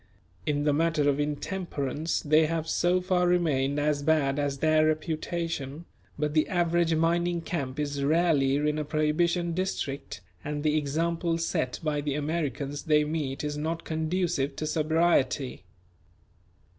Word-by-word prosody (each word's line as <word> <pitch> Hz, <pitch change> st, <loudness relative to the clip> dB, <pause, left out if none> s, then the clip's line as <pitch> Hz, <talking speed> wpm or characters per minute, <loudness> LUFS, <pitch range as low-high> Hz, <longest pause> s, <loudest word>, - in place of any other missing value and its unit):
In 145 Hz, -1 st, +1 dB
the 145 Hz, -1 st, +2 dB
matter 160 Hz, -1 st, +2 dB
of 145 Hz, 0 st, +2 dB
intemperance 150 Hz, 0 st, -2 dB
they 155 Hz, +1 st, +4 dB
have 160 Hz, 0 st, -2 dB
so 175 Hz, +2 st, +2 dB
far 180 Hz, -1 st, +1 dB
remained 145 Hz, -6 st, +1 dB
as 145 Hz, -1 st, +1 dB
bad 145 Hz, -2 st, +2 dB
as 140 Hz, -1 st, -1 dB
their 155 Hz, +1 st, +3 dB
reputation; 155 Hz, -1 st, -3 dB, 0.3 s
but 150 Hz, 0 st, -1 dB
the 155 Hz, -1 st, +3 dB
average 170 Hz, -2 st, +2 dB
mining 170 Hz, +1 st, +1 dB
camp 145 Hz, -5 st, -4 dB
is 145 Hz, -1 st, -2 dB
rarely 150 Hz, -3 st, +3 dB
in 150 Hz, +1 st, 0 dB
a -, -, -1 dB
Prohibition 165 Hz, +3 st, +1 dB
district 140 Hz, -, -3 dB, 0.2 s
and 145 Hz, 0 st, -3 dB
the 155 Hz, -1 st, +2 dB
example 165 Hz, +3 st, 0 dB
set 165 Hz, -6 st, -1 dB
by 150 Hz, -2 st, 0 dB
the 145 Hz, -1 st, -2 dB
Americans 145 Hz, -2 st, -2 dB
they 150 Hz, -2 st, +4 dB
meet 150 Hz, -3 st, -3 dB
is 150 Hz, 0 st, -3 dB
not 165 Hz, +2 st, -2 dB
conducive 160 Hz, -3 st, -1 dB
to 155 Hz, -, -3 dB
sobriety. 155 Hz, -, +1 dB
155 Hz, 145 wpm, -28 LUFS, 145-165 Hz, 0.3 s, they